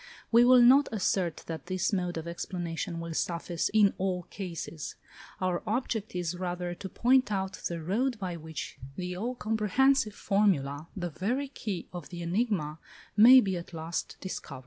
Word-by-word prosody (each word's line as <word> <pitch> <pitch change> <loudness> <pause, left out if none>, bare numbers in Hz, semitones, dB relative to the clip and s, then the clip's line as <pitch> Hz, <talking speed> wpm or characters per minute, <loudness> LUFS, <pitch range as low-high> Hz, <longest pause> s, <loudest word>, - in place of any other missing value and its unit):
We 235 +1 +7
will 250 0 +7
not 270 +4 +6
assert 185 -5 0
that 165 +1 -6
this 185 +3 0
mode 180 -3 -1
of 160 +1 -5
explanation 170 -1 -4
will 165 0 -5
suffice 170 +1 -1
in 205 -2 +5
all 185 -1 -1
cases; 170 -5 -6 0.4
our 185 -2 0
object 220 -2 -2
is 175 -1 -2
rather 180 -1 -3
to 190 +2 -7
point 255 +2 +3
out 190 -1 -2
the 170 -1 -4
road 235 +8 0
by 185 -4 -4
which 160 -1 -7 0.2
the 180 +1 -4
all 235 +7 -3
comprehensive 225 +2 +2
formula, 165 -8 +1
the 175 -2 -3
very 250 - -2
key 205 -9 -5
of 175 -5 -7
the 175 -1 -6
enigma, 170 -5 -1 0.4
may 245 +5 +9
be 195 -4 -1
at 170 0 -9
last 165 +1 -4
discovered. 185 -7 -6
185 Hz, 165 wpm, -29 LUFS, 170-220 Hz, 0.4 s, may